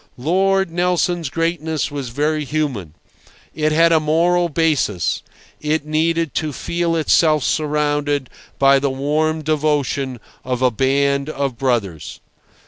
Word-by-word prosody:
Lord 190 +6 +1
Nelson's 175 -2 0
greatness 160 -1 -2
was 140 -4 -5
very 150 +5 -1
human. 135 - -3 0.6
It 155 -1 0
had 165 +2 +4
a 160 - +5
moral 170 +3 +2
basis; 150 - 0 0.4
it 150 0 -1
needed 165 +1 0
to 155 -1 -2
feel 170 +4 -2
itself 155 -2 +3
surrounded 145 -1 0 0.3
by 135 0 +5
the 140 0 0
warm 155 +4 -1
devotion 145 -4 -1 0.2
of 125 0 -2
a 125 - +4
band 140 +3 +1
of 140 -4 -2
brothers. 115 - -2
150 Hz, 125 wpm, -19 LUFS, 135-160 Hz, 0.6 s, a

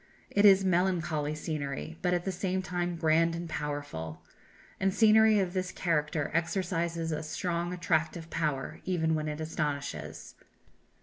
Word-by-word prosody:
It 200 +1 +4
is 195 -1 +7
melancholy 170 -5 +1
scenery, 155 0 -4
but, 180 - +1
at 175 -1 0
the 190 - 0
same 185 0 -1
time, 175 -1 -2
grand 165 0 +3
and 170 0 -5
powerful. 145 - -5 0.6
And 195 0 +2
scenery 220 +1 +6
of 185 -3 0
this 185 -1 -2
character 150 -3 0
exercises 170 -1 -1
a 155 0 -2
strong 170 +2 -2
attractive 165 -2 -1
power, 150 -5 -2
even 160 -3 +1
when 155 -1 -1
it 150 0 -4
astonishes. 150 -3 -4
165 Hz, 140 wpm, -30 LUFS, 155-180 Hz, 0.6 s, is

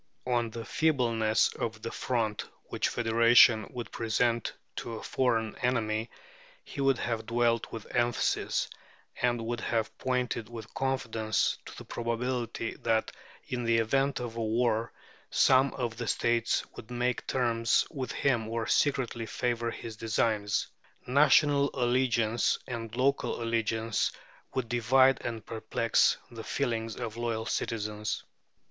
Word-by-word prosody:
On 120 -2 +1
the 115 0 -7
feebleness 115 -8 +2
of 110 -1 -4
the 115 - -4
front 115 -4 -2 0.2
which - - 0
federation 115 -1 +5
would 120 -2 -6
present 115 +1 0 0.3
to 115 - -4
a - - -8
foreign 115 -4 0
enemy 115 -3 0 0.5
he 140 - -6
would 135 -2 +3
have 115 -2 -3
dwelt 115 -1 +1
with 115 -2 -7
emphasis, 120 0 +1 0.5
and 120 -2 +1
would 120 +1 -2
have 115 -2 -1
pointed 125 -3 -1
with 115 -2 -9
confidence 115 -5 0
to - - -10
the - - -9
probability 120 0 -2
that 110 -1 +1 0.4
in 125 -1 -3
the 115 0 +3
event 135 +5 +1
of 120 -2 -5
a - - -1
war 115 0 +1 0.4
some 130 +1 +4
of 120 -3 -3
the 120 -1 -4
states 115 +1 +1
would 110 - -10
make 125 0 -1
terms 115 -3 +2
with 130 -6 -4
him 120 -5 +1
or 115 0 -2
secretly 125 -5 +1
favour 120 -1 -1
his 115 -1 -7
designs. 110 -1 0 0.4
National 140 +1 +4
allegiance 120 -3 +2
and 115 -3 -5
local 140 +2 +1
allegiance 115 -1 0 0.4
would 130 -3 -1
divide 130 +3 +4
and 115 -3 -4
perplex 115 0 +2
the 115 -1 -8
feelings 115 -5 -2
of 115 0 -5
loyal 115 -2 -2
citizens. 105 -2 -2
115 Hz, 135 wpm, -29 LUFS, 115-125 Hz, 0.5 s, federation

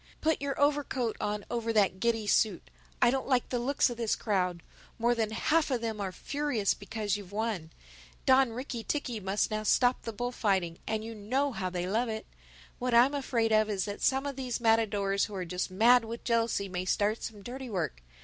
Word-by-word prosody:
Put 315 -2 +1
your 280 -1 -2
overcoat 280 -5 +1
on 210 -1 -2
over 230 -1 -1
that 195 -3 +3
giddy 225 0 +1
suit. 205 -2 +1 0.3
I 240 - +6
don't 265 0 -2
like 255 -3 +1
the 245 - -1
looks 275 +4 +2
of 240 - -6
this 230 -2 0
crowd. 180 -5 -1 0.3
More 235 +1 +2
than 225 -2 0
half 300 +9 +1
of 250 -4 0
them 220 -2 -3
are 190 -2 -2
furious 280 -3 -1
because 205 0 -3
you've 200 -2 -10
won. 210 -6 -2 0.6
Don 260 -2 +5
Ricky 240 0 -5
ticky 250 -5 -2
must 195 +2 0
now 215 0 -1
stop 245 +3 +3
the 230 - -5
bullfighting—and 215 -3 -1
you 225 - -6
know 255 +7 -1
how 185 -6 -3
they 180 0 -3
love 225 +5 0
it. 220 0 -4 0.5
What 250 -1 0
I'm 250 +4 +6
afraid 235 -5 0
of 215 0 +4
is 195 -3 -1
that 205 0 -6
some 270 +1 +2
of 280 -2 -4
these 250 -3 -3
matadors 210 -4 +2
who 210 - -8
are 185 -2 -3
just 180 +3 -3
mad 230 +5 +5
with 230 +1 -7
jealousy 230 -4 +1
may 180 -1 -4
start 210 +4 +1
some 210 -3 -7
dirty 255 +2 -6
work. 170 - -3
225 Hz, 200 wpm, -30 LUFS, 205-245 Hz, 0.6 s, I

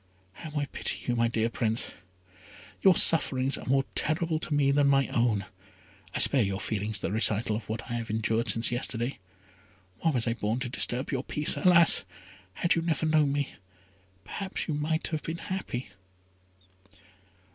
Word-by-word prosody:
"How 155 - -7
I 145 - -1
pity - - -2
you, 120 - 0
my 115 0 +2
dear 115 -1 0
Prince; 115 -1 -2 0.9
your 190 -2 +6
sufferings 135 -5 +3
are - - -7
more 135 +1 +3
terrible 160 0 0
to 165 - -2
me 140 -1 +3
than 140 0 +3
my 135 -1 +3
own. 115 -4 +1 0.7
I - - +2
spare 135 - +3
your 100 -2 -1
feelings 105 0 -2
the - - -3
recital 110 0 +1
of 105 -1 -7
what 110 +1 -3
I 120 - -7
have 115 -1 -5
endured 110 +1 0
since 115 +4 +3
yesterday. 120 0 -3 0.8
Why 165 - +1
was 125 -7 0
I 115 - +1
born 115 +1 -2
to 125 - -2
disturb 125 +2 0
your 135 -2 -2
peace? 150 +2 0
Alas! 170 -2 +5 0.5
had 175 - +2
you 165 - 0
never 165 -1 -1
known 155 -2 +3
me, 140 -1 -1 0.8
perhaps 195 -1 -4
you 160 - -1
might 155 +2 -1
have 155 -2 -3
been 165 +1 -5
happy." 170 -10 -5
130 Hz, 170 wpm, -28 LUFS, 115-155 Hz, 0.9 s, your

